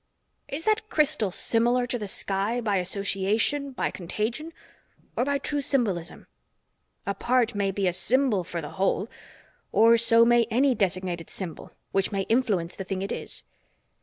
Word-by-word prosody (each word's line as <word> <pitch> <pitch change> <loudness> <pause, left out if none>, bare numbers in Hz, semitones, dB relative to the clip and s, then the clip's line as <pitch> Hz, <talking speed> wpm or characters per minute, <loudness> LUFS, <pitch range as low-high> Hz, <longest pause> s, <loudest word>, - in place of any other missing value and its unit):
Is 290 +4 -4
that 430 +1 +1
crystal 300 - +2
similar 240 +6 +2
to 245 0 -3
the 210 - -4
sky, 200 +4 -1
by 210 -4 0
association, 200 +9 0
by 255 - -2
contagion, 220 - -4 0.6
or - - +1
by 280 +1 +1
true 290 +1 -2
symbolism? 200 - -1 0.8
A 200 - -1
part 245 +3 +1
may 200 -1 0
be 195 0 0
a 180 - +1
symbol 220 +2 +1
for 170 -1 -5
the 150 - -7
whole 195 +2 +1 0.6
or 230 +1 +6
so 230 0 +5
may 240 0 +4
any 260 +4 +3
designated 185 -5 -1
symbol, 180 -5 -6 0.2
which 195 +1 0
may 200 -1 -1
influence 205 -7 0
the 190 - -5
thing 190 0 -3
it 200 - -4
is. - - -3
220 Hz, 160 wpm, -26 LUFS, 190-250 Hz, 0.8 s, or